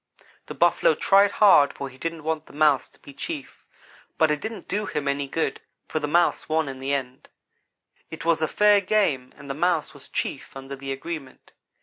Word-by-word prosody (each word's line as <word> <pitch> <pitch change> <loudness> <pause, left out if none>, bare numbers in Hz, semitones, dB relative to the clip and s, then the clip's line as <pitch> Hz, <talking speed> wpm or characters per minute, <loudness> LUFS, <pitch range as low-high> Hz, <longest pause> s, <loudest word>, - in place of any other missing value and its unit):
The - - -7
Buffalo - - +3
tried 200 +1 +4
hard 150 -9 +6
for 140 - -6
he 130 0 -14
didn't 165 0 -4
want 160 0 -2
the - - -16
Mouse 150 -2 +3
to - - -26
be 140 - -13
chief 295 - -7 0.5
but 160 -1 +3
it 150 - -1
didn't 220 0 -6
do 210 +2 -2
him 150 -5 -3
any 140 0 -1
good; 160 +4 -2 0.3
for 155 - -2
the 150 - -2
Mouse 170 +2 +2
won 160 -1 +1
in 135 -1 -6
the 135 +1 -3
end. 130 -2 -4 0.8
"It 160 0 -8
was 165 -1 +2
a 155 - +2
fair 210 +2 +4
game 185 -11 +1
and 140 - -12
the 135 - -3
Mouse 165 +1 0
was 145 -2 -12
chief 135 - -4
under 135 +1 -7
the 135 0 -6
agreement. 135 0 -7
155 Hz, 205 wpm, -24 LUFS, 140-175 Hz, 0.8 s, hard